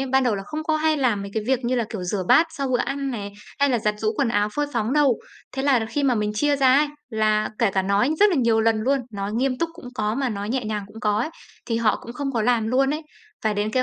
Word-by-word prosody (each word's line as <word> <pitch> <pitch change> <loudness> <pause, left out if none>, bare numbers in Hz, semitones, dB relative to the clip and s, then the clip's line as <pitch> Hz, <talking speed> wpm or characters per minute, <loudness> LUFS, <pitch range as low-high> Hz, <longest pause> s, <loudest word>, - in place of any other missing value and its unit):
ấy, 270 - -1
ban 265 +1 +2
đầu 240 -4 +2
là 195 - -4
không 310 +9 -5
có 315 -1 +1
hay 315 0 +2
làm 240 -8 +1
mấy 200 - -7
cái 220 - 0
việc 260 -1 +1
như 250 +2 +1
là, 240 - +1
kiểu, 205 -5 -5
rửa 185 +2 -2
bát 325 - +6
sau 280 -4 -3
bữa 250 -1 +1
ăn 275 +1 -2
này, 205 -4 -5 0.3
hay 280 0 +4
là 245 - +2
giặt 210 -1 0
giũ 215 0 0
quần 275 - +1
áo 205 -2 +1
phơi 295 0 0
phóng 220 +1 -1
đâu. 285 -5 +3 0.3
Thế 265 - -3
là 275 -2 +4
là 225 - -2
khi 255 +6 -2
mà 265 -3 +3
mình 210 -1 -1
chia 290 +6 +2
ra 260 -2 +5
ấy, 300 - +4 0.2
là 215 -1 +1
kể 230 -4 +3
cả 190 0 0
nói 200 +8 +2
rất 415 0 +7
là 355 - +1
nhiều 230 -4 +3
lần 225 0 +3
luôn, 270 +5 +2
nói 200 0 -4
nghiêm 255 +3 0
túc 335 - 0
cũng 335 -7 -11
có, 215 -1 -1
mà 265 0 0
nói 205 -2 -4
nhẹ 250 +1 -1
nhàng 210 -1 -3
cũng 215 +2 -12
có 210 -1 +1
ấy, 245 +8 -1 0.4
thì 230 -2 -1
họ 225 -2 +2
cũng 235 - -8
không 275 +2 -3
có 230 -4 0
làm 235 -1 +2
luôn 270 +3 +2
ấy, 310 - -5 0.4
phải 215 -1 +1
đến 205 +1 -1
cái 255 +3 +2
240 Hz, 305 wpm, -23 LUFS, 215-275 Hz, 0.4 s, rất